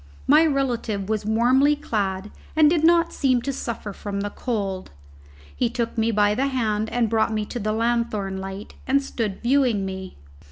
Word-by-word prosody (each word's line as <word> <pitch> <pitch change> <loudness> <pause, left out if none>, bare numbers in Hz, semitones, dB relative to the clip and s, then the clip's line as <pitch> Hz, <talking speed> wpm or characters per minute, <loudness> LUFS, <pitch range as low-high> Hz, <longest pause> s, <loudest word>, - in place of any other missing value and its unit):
My 305 +4 +6
relative 240 -8 -1
was 215 -1 -1
warmly 255 +6 +4
clad 205 -7 -2 0.2
and 310 -1 +6
did 315 0 +2
not 335 0 +4
seem 260 -3 +2
to 275 - -2
suffer 230 -5 -5
from 200 0 -4
the 205 0 -3
cold. 200 -7 -3 0.7
He 245 - +1
took 235 -1 -3
me 225 0 +1
by 210 -1 +3
the 265 +5 0
hand 220 -5 -1
and 240 -2 +1
brought 220 0 +1
me 215 -1 -1
to 240 - -5
the 215 0 -1
lanthorn 225 -4 -1
light, 195 +2 -7
and 275 +1 +3
stood 225 -7 -4
viewing 245 -6 +2
me. 190 0 -6
230 Hz, 175 wpm, -23 LUFS, 205-260 Hz, 0.7 s, My